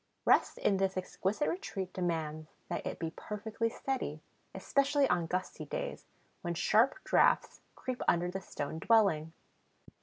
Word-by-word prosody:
Rest - - +4
in 195 - +2
this 190 0 0
exquisite 190 +7 -1
retreat 195 - -3
demands 160 -3 -2 0.2
that - - -2
it - - -4
be 165 -1 -3
perfectly 220 +2 -3
steady, 235 - -3 0.4
especially 280 0 +2
on 175 -2 +1
gusty 185 +2 -3
days, - - -5 0.3
when 175 -2 -2
sharp 220 +8 +4
draughts - - +3
creep 255 -1 -4
under 175 +1 +3
the 190 +1 -4
stone 160 -3 -5
dwelling. 180 -8 +3
190 Hz, 140 wpm, -32 LUFS, 170-230 Hz, 0.4 s, Rest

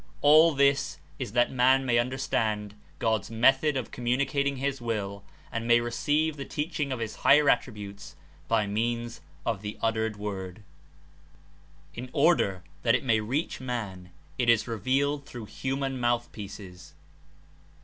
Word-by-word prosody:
All 155 +2 +6
this 140 0 +2 0.2
Is 100 - -5
The 120 - +4
Word - - +2
^^^^ - - -10
^^^ 130 +2 +4
^ 120 -2 +3
understand 110 -5 -2 0.2
God's 110 0 0
method 135 +5 +3
of 130 - -4
communicating 140 +3 0
his 135 0 -2
Will 100 -4 -3 0.3
and 115 0 -3
may 120 0 +6
re 120 0 -3
ceive 150 +5 0
the 140 - -4
teaching 150 0 -3
of 130 - -2
his 115 -2 -4
higher 145 +1 +5
attributes 105 -4 -4 0.3
by 110 -2 +2
means 115 0 -2 0.2
of 110 -4 -1
the 105 0 -6
uttered 110 -1 -1
Word. 100 -1 -6 1.3
In 125 +2 -7
order 140 - +2 0.2
that 115 0 +3
It 125 - -1
may 115 -4 +3
reach 130 +9 -2
man 105 -8 -5 0.3
It 120 -2 +2
Is 115 0 +4
revealed 135 +6 0
through 120 -5 -8
human 135 +4 -3
mouth 120 0 0
pieces. 95 -3 -10
120 Hz, 150 wpm, -28 LUFS, 110-135 Hz, 1.3 s, All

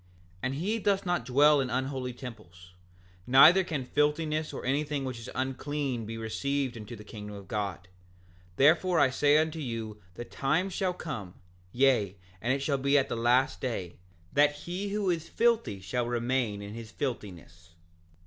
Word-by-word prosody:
7:21 90 - -30 0.3
And 130 +1 -2
he 205 +10 -1
doth 200 -2 +1
not 175 -9 0
dwell 145 +3 +5
in 130 - -2
unholy 130 0 -2
temples; 105 -8 -11 0.5
neither 155 +9 +8
can 155 -7 -3
filthiness 150 +2 0
or - - -7
anything 145 +1 -1
which 130 -2 -5
is 115 - -8
unclean 130 -2 -2
be 115 0 -5
received 130 +4 -2
into 115 +1 -8
the 105 - -11
kingdom 105 -1 -8
of 100 -2 -10
God; 100 -3 -3 0.7
therefore 165 - +4
I 130 - +4
say 145 +2 +4
unto 160 +1 0
you 115 -6 -5
the 120 - -6
time 155 +11 0
shall 185 0 -1
come, 110 - -6 0.4
yea, 120 -6 +2 0.2
and 120 - 0
it 135 +1 0
shall 140 -1 0
be 140 +2 +3
at 135 0 +1
the - - -2
last 120 +3 +2
day, 95 -9 -4 0.4
that 145 +1 +4
he 185 +4 -3
who 200 -2 0
is 165 -1 -3
filthy 225 - +1
shall 120 +6 -2
remain 120 -3 -1
in 100 +1 -7
his 115 -1 -8
filthiness. 90 -9 -6
130 Hz, 170 wpm, -29 LUFS, 115-150 Hz, 0.7 s, neither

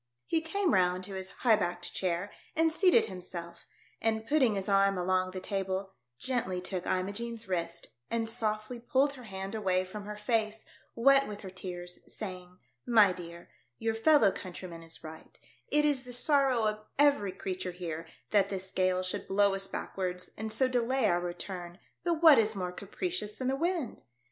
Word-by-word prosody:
He 325 - +1
came 360 +3 0
round 180 -1 +3
to 195 +1 -7
his 190 0 -5
high 230 -3 +3
backed 175 -3 -3
chair, 185 +2 -1 0.2
and 325 0 +3
seated 365 +1 +5
himself, 180 -3 -8 0.3
and, 220 0 0
putting 260 -6 +3
his 195 -1 -2
arm 195 -1 +4
along 185 +1 +1
the 185 0 -5
table, 190 0 -3 0.2
gently 230 - 0
took 180 0 -4
Imogene's 220 +4 -2
wrist, 170 -2 -2 0.2
and 230 -1 0
softly 220 +1 -2
pulled 270 +4 +2
her 255 -3 -11
hand 195 -1 -5
away 190 -4 +1
from 200 +2 -8
her 210 0 -6
face, 220 0 0 0.3
wet 275 +3 +5
with 205 -1 -7
her 190 - -8
tears, 180 -1 -7
saying, 180 -3 -7 0.2
" - - -51 0.2
My 195 -2 +3
dear, 170 -1 -10 0.3
your 225 0 0
fellow 225 -2 +5
countryman 175 -2 -7
is 165 0 -10
right; 160 0 -11 0.3
it 300 0 +3
is 290 -3 +2
the 250 -1 -7
sorrow 265 -2 +3
of 215 0 0 0.2
every 280 -9 +4
creature 185 0 -4
here 165 -2 -5 0.2
that 200 -2 +4
this 190 -1 -5
gale 185 -1 +1
should 185 - -3
blow 200 0 +3
us 195 0 -2
backwards, 180 -2 -4
and 220 +1 -4
so 255 +4 +3
delay 255 0 +1
our 175 -2 +2
return; 175 0 -6 0.3
but 335 -2 0
vvhat 315 -4 +10
is 220 -1 +2
more 180 -2 -2
capricious 210 - -4
than 255 +2 -2
the 265 - +1
wind 330 -4 -1
200 Hz, 180 wpm, -31 LUFS, 185-235 Hz, 0.3 s, vvhat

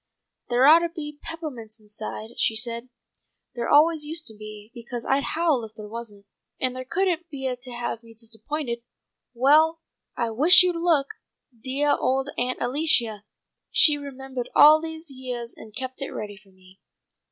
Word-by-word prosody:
"There 245 +2 +4
ought 315 +3 +9
to 340 0 -2
be 300 -3 -8
peppahmints 255 -10 -7
inside," 215 +1 -7
she 220 - +2
said. 235 +2 -2 0.6
"There 240 -1 -3
always 310 +1 +4
used 320 +2 -4
to 220 - -6
be, 215 0 -11
because 240 -1 -7
I'd 275 +1 0
howl 315 -7 +2
if 220 0 -10
there 215 -1 -9
wasn't, 210 -2 -9 0.3
and 255 -1 -1
they 255 0 -6
couldn't 350 +2 -1
beah 265 -4 -3
to 250 0 -11
have 240 -1 -4
me 230 -1 -16
disappointed. 235 +3 -5 0.5
Well, 310 +6 +4 0.4
I 235 -2 -1
wish 310 +11 +8
you'd 360 -1 +1
look! 335 -5 +2 0.5
Deah 270 +5 +1
old 270 +2 -1
Aunt 250 +1 -1
Alicia! 240 -6 0 0.4
She's 295 -2 +5
remembahed 265 -3 -6
all 305 +1 +8
these 320 -1 -6
yeahs 250 -3 -6
and 215 -1 -13
kept 260 +2 -6
it 275 - -3
ready 205 -1 -6
for 195 0 -21
me." 185 0 -21
255 Hz, 165 wpm, -24 LUFS, 230-300 Hz, 0.6 s, ought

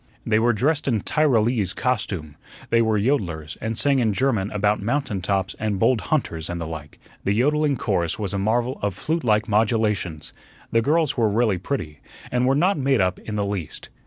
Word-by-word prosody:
They 110 -1 +3
were 120 +2 +3
dressed 145 +8 0
in 115 -6 +1
Tyrolese 115 - +1
costume; 95 - -2 0.4
they 115 - +4
were 110 -1 +2
yodlers, 95 - -1
and 110 0 -3
sang 140 -2 +3
in 110 -4 +2
German 110 -5 0
about 105 0 0
"mountain 115 -3 -1
tops" 95 0 -1
and 105 -2 -1
"bold 115 +3 +2
hunters" 85 - -1
and 85 0 -3
the 85 - -4
like. 80 -2 -8 0.3
The 100 - +1
yodling 145 +3 +2
chorus 90 -8 -1
was 100 -3 -3
a 100 - -1
marvel 120 +5 0
of 100 -2 -1
flute 160 - -2
like 110 -1 +2
modulations. 105 -7 0 0.4
The 115 - +3
girls 155 +3 +1
were 115 -3 +3
really 105 -3 +1
pretty, 85 - -4 0.3
and 125 +1 +1
were 135 - +3
not 180 +3 +2
made 135 -2 +2
up 90 -1 +1
in 105 - -6
the 100 -1 0
least. 100 -6 -5
110 Hz, 190 wpm, -23 LUFS, 95-130 Hz, 0.4 s, they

